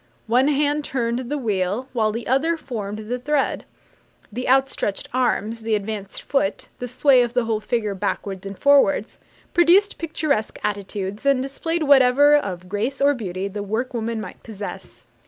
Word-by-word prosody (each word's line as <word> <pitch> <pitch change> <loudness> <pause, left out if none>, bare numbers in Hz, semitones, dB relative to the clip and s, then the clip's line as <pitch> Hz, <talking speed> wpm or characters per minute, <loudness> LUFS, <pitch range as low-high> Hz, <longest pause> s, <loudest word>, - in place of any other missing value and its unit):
One 250 +4 +3
hand 295 0 +1
turned 240 -3 -1
the 295 - -1
wheel, 210 0 -1
while 220 -3 +1
the 230 +2 -5
other 315 +7 +1
formed 215 -6 -6
the 250 +2 -2
thread. 290 +2 0 0.7
The 250 +3 -3
outstretched 265 -6 +1
arms, 230 -3 0
the 220 -1 0
advanced 205 -1 -5
foot, 275 -8 -1
the 245 - -4
sway 255 +1 +4
of 240 0 -1
the 245 -2 +2
whole 225 -1 0
figure 215 -1 -1
backwards 195 0 -3
and 195 -1 -7
forwards, 275 -7 +3 0.3
produced 360 +4 +4
picturesque 305 -8 -1
attitudes, 200 0 -3
and 275 -2 +3
displayed 315 +5 -2
whatever 280 +1 +6
of 185 -10 -2
grace 220 +8 -2
or 285 +1 +4
beauty 195 -6 -4
the 205 +1 -5
work 220 +6 -2
woman 230 -1 -2
might 215 - -8
possess. 210 -3 -9
240 Hz, 160 wpm, -22 LUFS, 210-275 Hz, 0.7 s, whatever